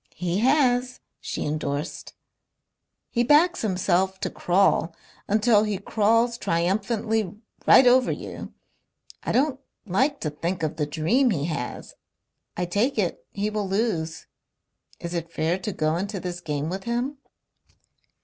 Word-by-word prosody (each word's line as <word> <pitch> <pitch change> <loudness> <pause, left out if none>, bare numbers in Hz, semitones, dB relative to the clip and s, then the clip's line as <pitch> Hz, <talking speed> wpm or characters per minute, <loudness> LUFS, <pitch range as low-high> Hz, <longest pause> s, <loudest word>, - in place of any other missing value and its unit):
"He 180 +3 -1
has," 250 -1 +2 0.2
she - - -4
endorsed. 150 +1 -4 1.0
"He 235 - +1
backs 315 +8 +4
himself 190 -2 +1
to - - -2
crawl 175 -2 +2 0.3
until 210 +1 +4
he 210 -2 -1
crawls 230 +4 +1
triumphantly 205 +4 0 0.3
right 265 - +8
over 250 0 +5
you.... - - -7 0.7
I - - -3
don't 270 0 +1 0.3
like 260 +9 +1
to 150 - -2
think 170 +3 -3
of 155 0 -2
the 150 -2 -1
dream 170 - +2
he 150 -9 0
has.... 155 -7 -5 0.6
I 180 - 0
take 205 +10 0
it - - -2
he 210 +1 -2
will 210 -2 -2
lose. 190 -6 -1 0.7
Is 170 0 -5
it 170 -1 -4
fair 170 +3 0
to 200 +3 -3
go 155 -3 0
into 200 +2 -3
this 175 -1 -5
game 150 -2 -3
with 190 +3 -5
him?" 245 +4 -2
195 Hz, 140 wpm, -25 LUFS, 170-235 Hz, 1.0 s, right